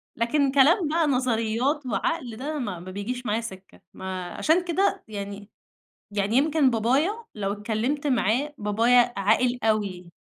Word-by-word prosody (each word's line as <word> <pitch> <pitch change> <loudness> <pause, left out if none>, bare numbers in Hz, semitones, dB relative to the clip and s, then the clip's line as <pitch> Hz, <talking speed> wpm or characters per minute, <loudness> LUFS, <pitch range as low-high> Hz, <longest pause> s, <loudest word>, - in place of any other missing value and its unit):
لكن 265 +5 +1
كلام 295 +5 +4
بقى 325 -1 +2
نظريات 255 +2 0
وعقل 245 +2 -2
ده 295 +3 -4
ما 205 -8 -4
ما 185 +2 -9
بيجيش 245 +6 -5
معايا 220 +1 0
سِكة، 190 -4 -10
ما 185 -1 -5
عشان 335 +3 +2
كده 370 +4 0
يعني 205 -1 -7 0.6
يعني 205 +2 -1
يمكن 295 -1 +3
بابايا 280 - +1
لو 200 -1 -2
اتكلَّمت 230 +8 -2
معاه، 260 +4 +1
بابايا 235 +4 +3
عاقل 245 +5 +2
أوي. 195 -5 -1
240 Hz, 140 wpm, -25 LUFS, 205-285 Hz, 0.6 s, كلام